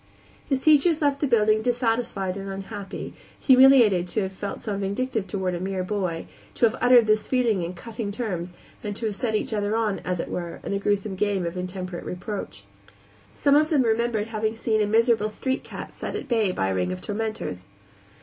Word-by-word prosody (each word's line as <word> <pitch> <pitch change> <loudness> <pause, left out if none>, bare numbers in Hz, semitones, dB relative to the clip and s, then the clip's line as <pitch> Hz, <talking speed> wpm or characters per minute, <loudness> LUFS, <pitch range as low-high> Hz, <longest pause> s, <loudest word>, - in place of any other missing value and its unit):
His 270 -2 +1
teachers 310 +2 +5
left 285 -2 +1
the 290 - +1
building 215 -3 +3
dissatisfied 230 -5 0
and 195 0 -6
unhappy; 195 +1 -6 0.3
humiliated 255 -9 +6
to 205 +4 0
have 190 - -3
felt 200 +1 -5
so 210 -3 -3
vindictive 200 +2 -2
toward 190 -3 -2
a 175 - -3
mere 190 0 -2
boy, 185 -4 -2 0.3
to - - +4
have 220 - +2
uttered 245 -2 +6
this 215 0 +2
feeling 235 -7 +2
in 170 +2 -4
cutting 220 +2 -5
terms, 185 -6 -4 0.3
and 205 -1 -4
to 230 - -4
have 210 -2 -1
set 220 +1 -1
each 215 - -1
other 205 0 0
on, 220 -3 0
as 180 -1 -3
it - - -3
were, 175 -1 -5
in - - -4
the 200 - 0
gruesome 205 0 0
game 195 -2 0
of 170 +1 -4
intemperate 180 -1 -5
reproach. 185 +3 -6 0.7
Some 280 -1 +3
of 305 +1 +4
them 290 -5 +3
remembered 225 -1 0
having 220 0 -1
seen 220 -1 0
a 210 - +2
miserable 225 0 +3
street 260 +5 -2
cat - - -8
set - - -5
at - - -5
bay 225 -6 +2
by 95 - -1
a - - 0
ring 90 -1 0
of 90 - -4
tormentors. 210 - -4
210 Hz, 200 wpm, -25 LUFS, 190-235 Hz, 0.7 s, humiliated